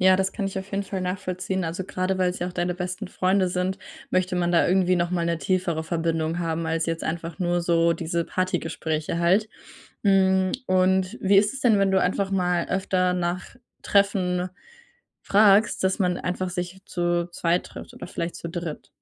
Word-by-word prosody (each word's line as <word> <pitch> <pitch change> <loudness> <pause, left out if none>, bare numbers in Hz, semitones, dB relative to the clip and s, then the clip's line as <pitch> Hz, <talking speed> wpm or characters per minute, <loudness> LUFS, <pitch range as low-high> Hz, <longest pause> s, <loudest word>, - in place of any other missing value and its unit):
Ja, 185 0 +6
das 190 0 0
kann 200 -3 -2
ich 195 - -5
auf 190 +1 -8
jeden 200 0 -2
Fall 190 0 -4
nachvollziehen, 185 0 -2
also, 165 +3 -3
grade 185 0 -2
weil's 180 0 +1
ja 175 - -2
auch - - -8
deine 180 0 -1
besten 180 +2 -4
Freunde 185 0 +1
sind, 180 +1 -1 0.3
möchte 185 0 +1
man 175 0 +1
da 170 - +4
irgendwie 185 0 +3
noch 175 0 0
mal 175 -2 0
'ne 170 -1 0
tiefere 180 -3 0
Verbindung 165 0 -1
haben 165 -1 -2
als 165 +1 0
jetzt 165 0 -2
einfach 165 +1 -4
nur 175 -1 +1
so 170 -1 +3
diese 170 +1 -2
Partygespräche 165 -3 -2
halt. 190 +6 +3 0.6
Hm, 190 -1 +3
und 185 +3 +2
wie 195 +1 +4
ist 205 +3 +4
es 270 - -7
denn, 225 -6 +4
wenn 195 -1 +3
du 190 - +3
einfach 195 +2 0
mal 180 -2 +1
öfter 185 -1 +1
nach 180 +4 -3 0.3
Treffen 185 -3 +2 0.7
fragst, 210 +1 +4
dass 190 +2 +1
man 180 -2 +1
einfach 180 0 -3
sich 180 +1 -5
zu 175 -1 0
zweit 170 +1 0
trifft - - -10
oder - - -8
vielleicht 170 -1 -4
zu 170 - -6
dritt? 170 -2 -6
180 Hz, 190 wpm, -25 LUFS, 170-190 Hz, 0.7 s, Ja